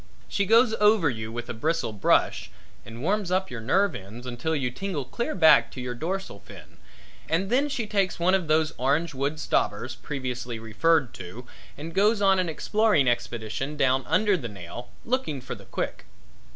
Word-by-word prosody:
She 200 -1 -1
goes 230 +1 +5
over 210 -8 +4
you 110 -1 -6
with 120 +1 -5
a - - -4
bristle 150 -1 -1
brush, 105 - +2 0.3
and 115 +2 -9
warms 200 +2 0
up 190 +1 0
your 120 -3 -5
nerve 190 - +2
ends 105 +6 -9
until 125 +6 -2
you 135 -4 -1
tingle 160 0 -4
clear 235 - -3
back 160 -4 +6
to - - -8
your 125 -1 -4
dorsal 175 - -4
fin - - -14 0.5
and 190 +5 0
then 275 +4 +2
she 250 -5 -2
takes 200 -4 0
one 180 +2 +3
of 185 -4 +1
those 155 0 +2
orange 145 +5 +1
wood 140 +3 -2
stobbers - - -1
previously 125 -4 -5
referred 120 +5 +1
to, 95 +7 -9 0.3
and 160 +3 -7
goes 210 +3 +3
on 195 -1 +4
an 180 -2 0
exploring 210 - +2
expedition 120 +3 -2
down 135 -1 +2
under 195 +5 +3
the 140 -9 -4
nail, 100 +5 -9 0.2
looking 235 - -1
for 130 - -6
the - - -12
quick. - - -4
155 Hz, 180 wpm, -26 LUFS, 125-195 Hz, 0.5 s, back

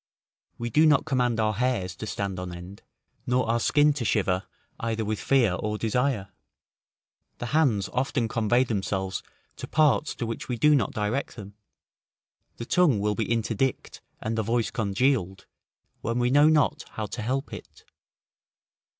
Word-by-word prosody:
We 120 0 -4
do 155 +7 +5
not 150 -3 +4
command 125 -6 +1
our 110 -1 +1
hairs 105 -6 -1
to 110 - -6
stand 100 -3 -3
on 90 -1 -5
end, 90 +3 -10 0.5
nor 125 -1 +1
our 115 +1 +1
skin 145 +4 +3
to 140 -4 -4
shiver 95 -4 0 0.3
either 115 -1 -2
with 110 0 -2
fear 125 -8 +3
or 105 +3 -2
desire; 115 -2 0 1.1
the - - -5
hands 120 -11 +2
often 125 -2 0
convey 115 +2 +2
themselves 95 -5 -2 0.4
to - - -7
parts 155 0 +2
to 120 - -3
which 115 +2 -5
we 125 - -1
do 150 +6 +5
not 130 -8 +2
direct 110 +6 -2
them; 100 -2 -10 1.0
the 115 - -6
tongue 150 - +3
will 105 +1 0
be 110 +2 -2
interdict, 115 +2 -1 0.2
and 110 +1 -3
the 110 - 0
voice 115 +1 0
congealed, 105 -3 0 0.6
when 115 +2 -2
we 125 0 +1
know 145 +3 +6
not 155 0 +2
how 110 - -3
to 105 +3 -6
help 130 +5 -2
it. - - -11
115 Hz, 160 wpm, -26 LUFS, 105-130 Hz, 1.1 s, know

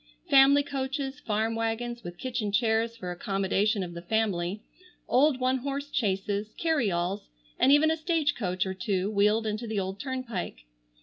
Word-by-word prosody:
Family 275 +1 +7
coaches, 275 0 -3
farm 220 -3 -1
wagons, 230 +1 -2
with 175 0 -8
kitchen 235 -4 -3
chairs 225 +1 +1
for 180 -5 -5
accommodation 195 +3 0
of 175 -1 -6
the 170 - -7
family; 195 -1 -1 0.4
old 270 +1 +3
one 255 +1 +1
horse 280 +2 -4
chaises, 205 -1 -1
carryalls, 200 - 0 0.3
and 270 - +5
even 300 +2 +5
a - - +2
stage 315 -2 +1
coach 185 -4 -1
or 190 - -3
two 190 +1 -1
wheeled 210 +2 +3
into 215 +2 -3
the 215 -2 -1
old 190 +1 -4
turnpike. 245 - -4
220 Hz, 160 wpm, -28 LUFS, 195-265 Hz, 0.4 s, Family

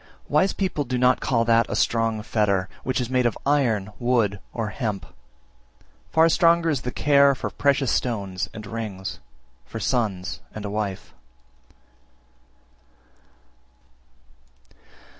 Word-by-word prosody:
345. - - -11
Wise 185 +6 +3
people 185 -6 -1
do 125 -1 -2
not 125 +1 +4
call 115 -3 +1
that 115 0 +3
a - - -2
strong 115 -2 +1
fetter 100 -4 +1 0.2
which 130 0 -1
is 125 0 -3
made 125 -1 +3
of 115 - -3
iron, 120 -9 +1
wood, 115 -5 +1
or 115 -3 -3
hemp; 105 -3 -3 1.0
far 160 +1 +5
stronger 165 0 +4
is 140 -5 -1
the 125 - -4
care 140 0 +4
for - - -4
precious 140 -3 +1
stones 100 -6 -2
and 110 -1 -9
rings, 105 -3 -5 0.4
for 60 - -7
sons 100 -5 -1
and 105 -1 -6
a 100 - -4
wife. 100 -6 -4
115 Hz, 130 wpm, -24 LUFS, 105-135 Hz, 1.0 s, far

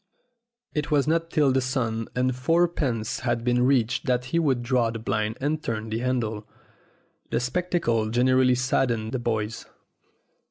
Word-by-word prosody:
It 150 -1 -2
was 145 -1 +2
not 165 +1 +1
till 150 -5 +3
the 130 0 +2
sum 120 -4 -2
of 125 0 +1
fourpence 140 -6 0
had 120 -2 -1
been 125 0 +2
reached 125 +1 +1
that 125 -1 +1
he 170 - +3
would 135 -7 +1
draw 120 -1 +2
up 115 - -3
the 115 - -5
blind 110 0 -2
and 150 +3 -1
turn 110 -3 -3
the 110 - -1
handle. 115 -4 -2 0.8
The - - 0
spectacle 125 -5 0
generally 125 +2 +3
saddened 120 -3 0
the 130 - -2
boys. 110 -2 -3
125 Hz, 160 wpm, -25 LUFS, 115-135 Hz, 0.8 s, till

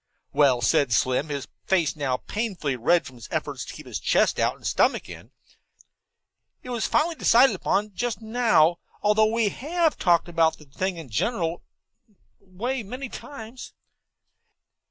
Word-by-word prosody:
"Well," 135 -5 +4
said 140 -4 +3
Slim, 130 +6 +1
his 140 -2 -4 0.2
face 175 -5 +2
now 135 -4 -1
painfully 190 - -3
red 165 +9 +2
from 130 - -11
his 120 - -10
efforts - - -3
to - - -9
keep - - -11 0.2
chest - - +2
out - - +1
and - - -16
stomach - - +1
in, - - -11 1.3
"it 250 - -7
was 235 -2 -1
finally 330 +3 +2
decided 265 -4 +4
upon 210 0 -1
just 240 +3 -2
now, 220 -8 +3 0.2
although 215 +1 +4
we 225 -2 +2
have 320 - -1
talked 175 -3 +3
about 165 -2 +2
the 150 - -16
thing 180 +6 -3
in 165 - -7
a - - -17
general 170 - -1 0.8
way 220 +7 -4
many 255 +6 -7
times." 240 -2 -9
190 Hz, 155 wpm, -25 LUFS, 155-235 Hz, 1.3 s, Well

